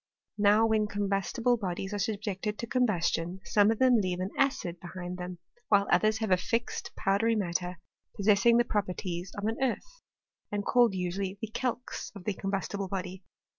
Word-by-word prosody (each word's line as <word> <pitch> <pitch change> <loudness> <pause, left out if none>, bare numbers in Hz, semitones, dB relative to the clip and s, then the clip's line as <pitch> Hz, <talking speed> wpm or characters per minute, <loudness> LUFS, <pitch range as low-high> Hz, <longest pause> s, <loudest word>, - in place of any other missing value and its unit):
Now 210 +2 +5
when 220 -1 +2
combustible 205 +4 0
bodies 195 -1 -4
are 205 - -2
subjected 210 0 -2
to - - -4
combustion, 190 -8 0
some 205 +1 +4
of 225 - +1
them 255 -1 +5
leave 185 -4 0
an 185 +2 -3
acid 260 -11 0
behind 180 +1 -7
them; 180 0 -5 0.3
while 200 -1 +4
others 215 0 +3
leave 220 -3 -1
a 185 - +6
fixed 230 +6 -2
powdery 215 +4 +2
matter, 180 -2 -2 0.4
possessing 210 +3 +4
the 240 - +4
properties 185 -4 -2
of 200 - -3
an 225 +1 -1
earth, - - -2 0.5
and 205 -1 -2
called 240 -5 +4
usually 185 +2 -2
the 220 -1 -5
calx 250 0 -3
of 195 - -9
the 205 - -1
combustible 195 0 -3
body. 185 0 -5
200 Hz, 170 wpm, -29 LUFS, 185-225 Hz, 0.5 s, a